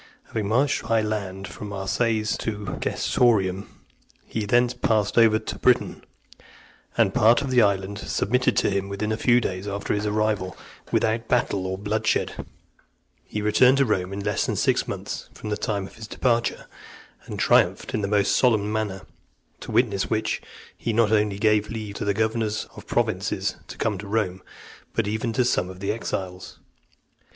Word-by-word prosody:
Having 105 -2 -2
marched 130 +6 +2
by 115 -1 +2
land 100 -3 -3
from 105 - -8
Marseilles 110 +2 0
to 105 -2 -4
Gessoriacum, 100 -6 +1 0.6
he 110 -2 -3
thence 120 +3 +3
passed 110 -4 +1
over 115 -2 +6
to 110 - -6
Britain, 125 -1 +2 0.9
and - - +3
part 115 +5 +5
of 135 - -3
the 125 -1 +5
island 100 -1 +1
submitting 125 +6 +1
to - - +2
him, 100 0 -1
within 105 +2 -2
a - - +1
few 120 +2 +4
days 95 -3 -3
after 100 0 -2
his 105 0 -1
arrival, 105 -3 0 0.3
without 115 +1 +1
battle 100 -6 +1
or 95 0 -3
bloodshed, 110 +2 0 0.9
he 105 - -4
returned 125 +5 +5
to 140 - +4
Rome 95 -5 0
in 100 +1 -4
less - - 0
than - - -1
six - - +1
months - - -5
from 105 - -6
the - - +1
time 105 -2 -2
of - - -13
his 110 -1 -8
departure, 120 0 0 0.6
and - - -6
triumphed - - +2
in 110 - 0
the 100 - -1
most 100 0 +2
solemn 110 -4 +2
manner; 105 -3 -2 0.6
to - - -8
witness 110 -4 +1
which, 110 0 -1 0.3
he 115 - -2
not 110 -1 +3
only 105 -2 +2
(310) - - -10
gave 105 -1 +2
leave 110 -3 -5
to 100 - 0
governors 110 +1 -1
of - - -12
provinces - - -1
to - - -9
come 105 -4 -1
to 100 - -7
Rome, 100 -3 -1 0.5
but - - +1
even 110 +3 -1
to 125 +2 +2
some 95 -6 +1
of 95 0 -10
the 100 +1 -1
exiles. 95 -4 -5
105 Hz, 175 wpm, -24 LUFS, 100-115 Hz, 0.9 s, over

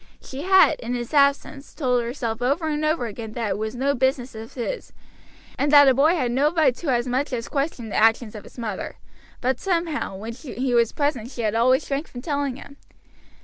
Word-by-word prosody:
She 270 +1 -8
had, 375 -3 +5
in 245 +1 -3
his 240 +3 -5
absence, 280 0 +1
told 250 -5 +1
herself 235 -1 -4
over 285 +6 0
and 300 0 -1
over 310 -4 +1
again 220 0 -7
that 230 -3 -2
it - - -1
was 220 +2 -3
no 275 +3 +1
business 260 -1 0
of 220 +1 -10
his, 270 - -4 0.7
and 285 - +1
that 285 -1 +8
a 265 - +6
boy 300 +7 +4
had 255 -7 0
no 280 +5 +2
right 315 -6 +3
to 340 - -7
as 240 -2 +1
much 260 +4 -1
as 235 -2 -3
question 275 -5 -3
the - - -5
actions 225 0 +3
of 210 - -9
his - - -16
mother; 220 -5 -5 0.4
but 255 0 0
somehow 335 - -1
when 220 +4 -6
he 255 -1 -4
was 235 -2 +3
present 275 -6 -1
she 240 -3 -6
had 210 -1 0
always 255 +5 +3
shrank 280 +3 -3
from 245 0 -9
telling 285 -4 -1
him. 280 +1 -12
260 Hz, 215 wpm, -23 LUFS, 235-290 Hz, 0.7 s, that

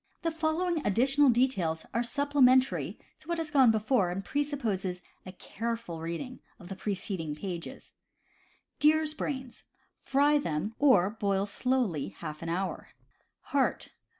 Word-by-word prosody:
The 330 - 0
following 325 +1 0
additional 270 +7 +3
details 200 -11 +1
are 235 - +1
supplementary 260 0 +2 0.2
to - - -18
what 340 0 -1
has 320 -2 -3
gone 270 -4 +6
before, 220 -2 +2
and 195 +2 -4
presuppose 280 -9 -1
a - - -1
amma 180 0 -4 0.3
s. 185 - -8
careful 225 -7 -5
reading 170 +11 -5 0.2
of 175 - -13
the 195 - -5
preceding 185 -6 -3
pages: 175 0 -7 0.9
Deer's 310 0 +3
Brains. 265 -5 -5 0.2
— - - -43
Fry 290 +2 +4
them; 190 - -2
or 220 -10 +5
boil 200 -2 0
slowly 200 - -1
half 150 0 -7
an 165 - -4
hour. 185 +3 -3 0.7
Heart. 275 -2 +1
235 Hz, 145 wpm, -29 LUFS, 185-285 Hz, 0.9 s, gone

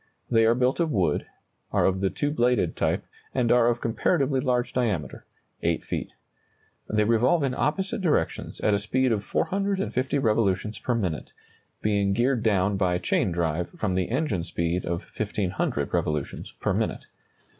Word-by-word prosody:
They 115 -1 +5
are 115 - +4
built 125 +4 +1
of 170 -2 +2
wood, 90 - +1 0.4
are - - +2
of 95 0 +1
the 95 - +2
two 145 +7 -1
bladed 120 - +1
type, - - 0 0.3
and 125 -3 +2
are 120 -1 +5
of 120 0 +1
comparatively 135 +3 +1
large 125 -1 0
diameter 105 - -2 0.3
8 - - 0
feet. - - -3 0.8
They 105 0 +2
revolve 120 +8 +3
in 135 -2 0
opposite 190 +10 -1
directions 150 - 0
at 105 - +3
a 100 - +2
speed 125 +5 +1
of 105 -2 0
450 195 - 0
revolutions 110 -4 +1
per 125 - -1
minute, 90 -9 -3 0.5
being 100 -2 +2
geared 120 +2 +2
down 100 -2 +2
by 90 -2 +2
chain 90 - +1
drive 85 0 -1
from 100 -4 -1
the 95 -1 0
engine 130 - 0
speed 85 +1 -2
of 85 0 -2
1,500 100 -3 -1
revolutions 75 -2 -2
per - - 0
minute. - - -2
110 Hz, 160 wpm, -26 LUFS, 95-130 Hz, 0.8 s, They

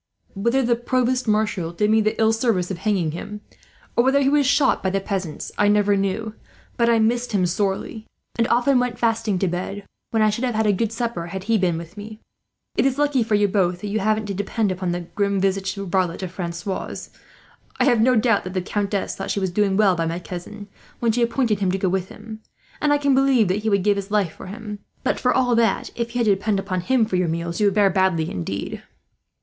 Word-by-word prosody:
Whether 235 +7 +1
a 240 -1 +2
provost 250 +1 0
marshal 210 -6 0
did 210 +5 +1
me 220 0 +4
the 215 0 -1
ill 220 0 +4
service 225 -6 0
of 180 - -5
hanging 190 -7 0
him, 205 +6 -7 0.5
or 235 - +4
whether 265 +2 +3
he 270 -1 +3
was 285 -1 +3
shot 275 -1 +3
by 190 - 0
the 195 +1 0
peasants, 190 -5 -4
I 205 - +4
never 205 0 +3
knew; 200 +3 -2 0.4
but 235 -1 +2
I 230 - +4
missed 235 +2 +1
him 190 -3 +2
sorely, 195 +4 -2 0.3
and 230 0 +1
often 250 +2 +3
went 245 -1 -1
fasting 225 -3 0
to 190 - 0
bed, 185 +3 -4 0.3
when 225 -1 +2
I 215 - +4
should 230 +4 -3
have 245 -3 0
had 220 0 +1
a 210 - +3
good 220 +3 -1
supper 230 -7 -3
had 190 +2 -6
he 225 +3 +1
been 175 -3 +1
with 170 +4 -9
me. 215 +1 -9 0.6
"It - - +3
is 265 0 -1
lucky 290 -3 +2
for 220 -2 +1
you 205 0 +3
both 180 -3 0
that 210 - -4
you 215 +2 0
haven't 215 +1 0
to 200 - -3
depend 205 +1 -1
upon 185 -1 -2
that 175 -1 -6
grim 200 -1 0
visaged 195 0 0
varlet 185 -2 -1
of 180 - -4
Francois'. 180 +2 -5 0.7
I - - +4
have 240 -5 +4
no 250 +2 +4
doubt 225 -2 +2
that 185 +1 -7
the 185 - +1
countess 200 0 -2
thought 195 - -5
she - - 0
was 190 -2 -1
doing 195 0 +1
well 205 -3 +4
by 165 -1 -1
my 165 +1 -2
cousin, 180 +4 -8 0.3
when 235 -1 +2
she 240 +2 0
appointed 235 -3 +1
him 190 -2 +1
to 190 - 0
go 190 -1 0
with 185 0 -2
him, 220 0 -10 0.4
and 295 - +2
I 290 - +4
can 285 -1 +2
believe 260 -6 +3
that 190 +3 +1
he 220 - 0
would 200 -2 +2
give 205 0 +2
his 200 0 -4
life 205 -5 +1
for - - -11
him; 210 +1 -7 0.2
but - - 0
for 250 - +2
all 250 -2 +2
that, 230 -1 +1
if 235 0 -4
you - - 0
had - - +2
to 205 - +5
depend 200 +1 -1
upon 185 -2 -2
him 235 +5 +2
for 190 -4 -1
your 180 -1 +1
meals, 170 +1 -3
you 205 - +5
would 200 - +1
fare 200 -2 +4
badly, 185 -4 +1
indeed." 90 +2 -4
205 Hz, 245 wpm, -22 LUFS, 190-230 Hz, 0.7 s, to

